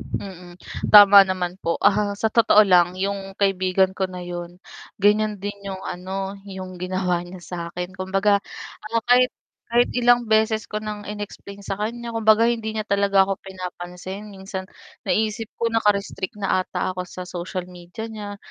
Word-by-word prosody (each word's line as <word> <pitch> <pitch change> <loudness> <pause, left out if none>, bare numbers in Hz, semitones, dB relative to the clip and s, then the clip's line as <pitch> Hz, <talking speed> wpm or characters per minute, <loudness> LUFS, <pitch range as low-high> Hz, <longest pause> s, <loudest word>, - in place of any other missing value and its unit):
Mm. 180 -2 -7 0.3
Tama 205 -1 +10
naman 185 0 -3
po 170 - -1
ahaha. 205 0 +2
Sa 220 +1 -1
totoo 220 -2 +6
lang 180 -2 +4
yung 195 0 -3
kaibigan 190 -1 +2
ko 190 0 -2
na 180 -1 -7
yun, 175 0 -7 0.4
ganyan 210 +1 +2
din 205 +1 -4 0.2
yung 190 -1 -5
ano, 190 +2 -4 0.2
yung 185 -2 -8
ginawa 180 -1 -1
niya 175 +1 -9
sakin. 180 +1 -6
Kumbaga 195 +2 +1 0.5
ah, 230 +1 0
kahit 250 +1 +5 0.4
kahit 240 +1 +4
ilang 245 -1 +4
beses 220 0 +2
ko 215 - -3
nang 210 -1 -6
inexplain 205 -1 -8
sa 195 +1 -4
kanya, 235 +2 -4
kumbaga, 220 0 +4
hindi 225 -2 -1
niya 215 - -2
talaga 200 -1 +3
ako 195 0 -3
pinapansin, 185 +2 -8
minsan 190 -1 -7 0.4
naiisip 220 0 0
ko 230 -1 -1
naka-restrict 205 -3 0
na 195 -2 +1
ata 185 - -3
ako 180 0 -6
sa 180 - -7
social 180 0 -5
media 180 +4 -9
niya. 210 -2 -7
195 Hz, 160 wpm, -23 LUFS, 185-215 Hz, 0.5 s, Tama